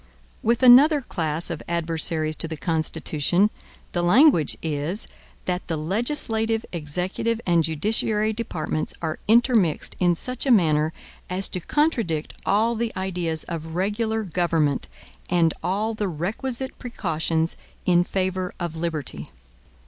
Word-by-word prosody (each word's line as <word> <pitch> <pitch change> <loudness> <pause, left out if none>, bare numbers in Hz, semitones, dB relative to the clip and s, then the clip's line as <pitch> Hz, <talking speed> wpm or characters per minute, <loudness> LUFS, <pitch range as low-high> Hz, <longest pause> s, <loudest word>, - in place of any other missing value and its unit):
With 235 +3 +1
another 280 +5 +8
class 165 - -2
of 165 - -4
adversaries 160 -2 -1
to - - -1
the 160 -1 -5
Constitution 160 +4 0 0.4
the 175 - -1
language 180 - +4
is 160 +6 -1 0.4
that 180 0 -2
the 165 -3 -2
legislative, 225 - +1
executive, 180 +8 -2
and 170 -2 +3
judiciary 210 +6 0
departments 160 -8 -3
are 155 -1 -2
intermixed 225 - +3
in 175 -1 +3
such 250 - -2
a - - +4
manner 155 -7 +4 0.4
as 185 +2 +1
to 185 - -2
contradict 220 - 0
all 220 +4 +3
the 230 0 -2
ideas 175 -4 -1
of 160 -1 -6
regular 220 +4 0
government 165 - 0 0.4
and 170 -2 +3
all 210 +5 -1
the 210 -2 -2
requisite 230 - -3
precautions 165 -8 -1 0.3
in 175 -1 +4
favor 185 0 -2
of 170 -2 -3
liberty. 155 - -4
180 Hz, 125 wpm, -24 LUFS, 160-220 Hz, 0.4 s, another